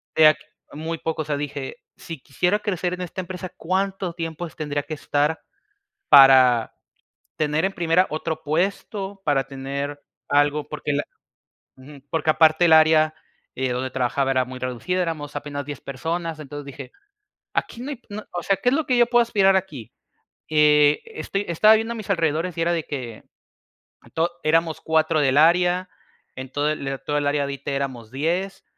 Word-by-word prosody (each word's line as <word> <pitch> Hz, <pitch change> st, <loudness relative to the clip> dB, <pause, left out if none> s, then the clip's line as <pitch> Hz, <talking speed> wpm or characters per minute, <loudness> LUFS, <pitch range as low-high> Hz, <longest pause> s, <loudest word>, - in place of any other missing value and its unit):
eh 155 Hz, -1 st, +7 dB
aq 155 Hz, -, +4 dB, 0.4 s
muy 160 Hz, +2 st, -5 dB
poco, 160 Hz, -1 st, -2 dB
o -, -, -14 dB
sea, 145 Hz, -1 st, -2 dB
dije: 145 Hz, -2 st, -5 dB, 0.2 s
"Si 165 Hz, -3 st, -8 dB
quisiera 180 Hz, +10 st, 0 dB
crecer 185 Hz, -4 st, -2 dB
en 180 Hz, -, -5 dB
esta 180 Hz, +1 st, -5 dB
empresa, 185 Hz, 0 st, -7 dB
¿cuánto 190 Hz, +1 st, -2 dB
tiempo 165 Hz, 0 st, -5 dB
es -, -, -16 dB
tendría 145 Hz, -3 st, -3 dB
que 155 Hz, -, -7 dB
estar 150 Hz, +2 st, 0 dB, 0.7 s
para 130 Hz, -4 st, +7 dB, 0.6 s
tener, 155 Hz, +3 st, +1 dB
en 195 Hz, -, -1 dB
primera, 175 Hz, +1 st, +2 dB
otro 160 Hz, +1 st, -3 dB
puesto, 195 Hz, +4 st, -2 dB
para 140 Hz, -3 st, +2 dB
tener 140 Hz, +2 st, -5 dB, 0.3 s
algo?", 145 Hz, +1 st, +2 dB
porque 150 Hz, -1 st, -3 dB
la 145 Hz, -, 0 dB, 0.7 s
ujú, 140 Hz, +2 st, -13 dB
porque, 160 Hz, -1 st, +1 dB
aparte, 160 Hz, +2 st, +4 dB
el 165 Hz, -, +4 dB
área, 155 Hz, 0 st, +5 dB, 0.4 s
eh, 130 Hz, 0 st, -2 dB
donde 130 Hz, +1 st, -3 dB
trabajaba, 135 Hz, +1 st, 0 dB
era 130 Hz, -1 st, +2 dB
muy 130 Hz, 0 st, -8 dB
reducida, 130 Hz, +9 st, -2 dB
éramos 150 Hz, -4 st, -4 dB
apenas 145 Hz, -1 st, -5 dB
10 145 Hz, -2 st, -7 dB
personas, 165 Hz, +4 st, -4 dB
entonces, 145 Hz, 0 st, -8 dB
dije: 140 Hz, -, -9 dB, 0.6 s
"Aquí 235 Hz, -, -2 dB
no 280 Hz, -, -5 dB
hay, 270 Hz, -, -6 dB
no 210 Hz, +1 st, -6 dB
o 175 Hz, -, -3 dB
sea, 195 Hz, +3 st, +1 dB
¿qué 245 Hz, +6 st, +1 dB
es 265 Hz, -, +1 dB
lo 320 Hz, -, -1 dB
que 250 Hz, -, +2 dB
yo 240 Hz, -, +6 dB
puedo 240 Hz, 0 st, +4 dB
aspirar 195 Hz, -4 st, +3 dB
aquí?", 150 Hz, -, -4 dB, 0.6 s
eh, 150 Hz, -1 st, +4 dB
estoy 320 Hz, -, -4 dB
estaba 210 Hz, +6 st, +5 dB
viendo 225 Hz, +2 st, -1 dB
a -, -, -7 dB
mis 215 Hz, -3 st, -8 dB
alrededores 165 Hz, 0 st, 0 dB
y -, -, -1 dB
era 170 Hz, +1 st, +2 dB
de 165 Hz, -2 st, -1 dB
que, 125 Hz, -6 st, -6 dB, 0.9 s
to 165 Hz, +2 st, 0 dB
éramos 165 Hz, 0 st, +1 dB
4 160 Hz, 0 st, +2 dB
del 135 Hz, 0 st, +2 dB
área, 180 Hz, +3 st, +3 dB, 0.5 s
en 130 Hz, 0 st, -8 dB
todo 145 Hz, +2 st, 0 dB
el 135 Hz, -3 st, -4 dB
toda 145 Hz, 0 st, 0 dB
el 145 Hz, -, -1 dB
área 145 Hz, 0 st, +1 dB
de 140 Hz, -, -4 dB
ite 140 Hz, 0 st, -4 dB
éramos 130 Hz, -5 st, -4 dB
10, 175 Hz, +8 st, -2 dB
155 Hz, 180 wpm, -23 LUFS, 145-180 Hz, 0.9 s, eh